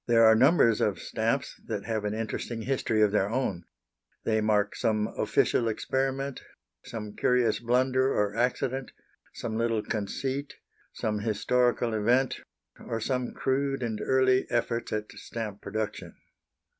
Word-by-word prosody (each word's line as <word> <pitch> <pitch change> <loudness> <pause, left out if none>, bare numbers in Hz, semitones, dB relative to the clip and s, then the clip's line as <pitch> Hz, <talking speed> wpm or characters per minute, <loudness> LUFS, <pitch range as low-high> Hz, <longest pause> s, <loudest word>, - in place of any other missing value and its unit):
There 115 -1 +6
are 110 - +8
numbers 125 -2 +5
of - - +1
stamps - - -2
that - - -3
have 110 -2 -2
an 105 +1 -1
interesting 115 +1 -4
history 115 -3 +1
of 105 - +3
their 100 -1 +2
own. 105 -8 -2 0.6
They 110 -1 +1
mark 105 -1 +1
some 105 -1 +1
official 115 - +2
experiment, 135 +4 -1 0.4
some 110 -5 -7
curious 125 -3 +2
blunder 130 +2 +2
or 105 -3 0
accident, 125 +2 -1 0.4
some 110 -1 -3
little 115 -2 +1
conceit, 130 +7 -3 0.4
some 105 -1 -2
historical 120 +2 +1
event, 120 +5 +2 0.4
or 115 - -4
some 125 +2 -1
crude 135 0 0
and 110 -3 -3
early 130 -1 +3
efforts 120 0 -1
at 105 0 -3
stamp 110 -3 -6
production. 110 +1 -4
115 Hz, 135 wpm, -28 LUFS, 110-130 Hz, 0.6 s, are